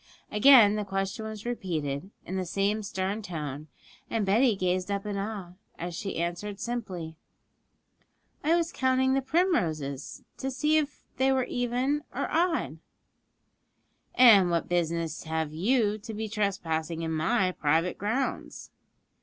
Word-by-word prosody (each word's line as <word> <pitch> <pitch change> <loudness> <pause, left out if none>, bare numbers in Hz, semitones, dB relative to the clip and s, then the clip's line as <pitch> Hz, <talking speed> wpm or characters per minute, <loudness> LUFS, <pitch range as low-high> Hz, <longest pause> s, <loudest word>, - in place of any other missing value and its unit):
Again 215 -2 +7
the 210 - -1
question 195 +2 -3
was 215 0 -7
repeated, 170 -8 -3 0.2
in 185 - -5
the 190 - -1
same 200 +4 0
stern 195 +1 -3
tone, 155 -6 -5 0.4
and 225 -3 0
Betty 220 +4 +4
gazed 185 0 -1
up 200 0 -2
in 205 -1 -3
awe, 200 -3 -4 0.3
as 175 +1 -5
she 195 +3 -4
answered 175 +4 -3
simply, 190 -10 -5 1.3
'I 320 +3 +4
was 340 -1 0
counting 260 0 +2
the 270 - +2
primroses, 175 - -1 0.2
to 265 - -2
see 300 +4 +2
if 295 -1 -2
they 265 +1 +3
were 260 -1 +2
even 250 +4 -1
or - - -1
odd.' 335 +1 0 1.4
'And 210 -8 +7
what 170 -1 0
business 170 -2 -1
have 160 -1 -2
you 210 +4 +1
to 220 +1 -8
be 220 +1 -3
trespassing 170 -6 -2
in 160 - -2
my 165 +4 +1
private 165 +2 0
grounds?' 225 +7 -3
200 Hz, 140 wpm, -28 LUFS, 170-245 Hz, 1.4 s, Again